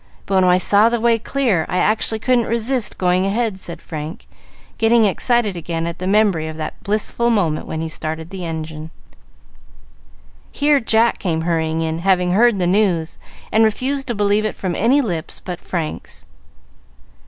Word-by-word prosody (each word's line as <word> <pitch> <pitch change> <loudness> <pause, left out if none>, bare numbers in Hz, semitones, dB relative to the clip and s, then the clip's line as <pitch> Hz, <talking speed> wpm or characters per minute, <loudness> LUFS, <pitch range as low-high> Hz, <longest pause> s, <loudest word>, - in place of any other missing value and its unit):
But 195 - -4
when - - +3
I 180 0 +5
saw 205 +4 +4
the 235 0 -1
way 230 0 +2
clear, 230 -9 0
I 180 - -1
actually 220 +2 +1
couldn't 240 +1 +1
resist 235 +1 -1
going 180 0 +2
ahead," 215 -1 -1
said 170 -2 -6
Frank, 155 0 -7 0.5
getting 225 0 +4
excited 215 0 +1
again 165 -1 -3
at 170 0 -5
the 185 - -3
memory 195 -6 +2
of 155 0 -7
that 155 - -6
blissful 215 +3 -1
moment 175 -9 0
when 160 - -4
he 165 - -3
started 160 +1 -5
the 190 -2 -6
engine. 160 -1 -6 1.6
Here 290 0 +2
Jack 225 0 +2
came 165 -4 -1
hurrying 160 -1 -1
in, 160 0 -2
having 180 0 +2
heard 230 +3 +4
the 180 - 0
news, 180 -4 +1 0.3
and 220 - +4
refused 265 +5 0
to 240 - -2
believe 205 +1 +2
it 215 - -2
from 185 -2 -3
any 245 +10 +3
lips 175 - -4
but 180 -1 -7
Frank's. 165 -4 -5
195 Hz, 170 wpm, -19 LUFS, 165-225 Hz, 1.6 s, I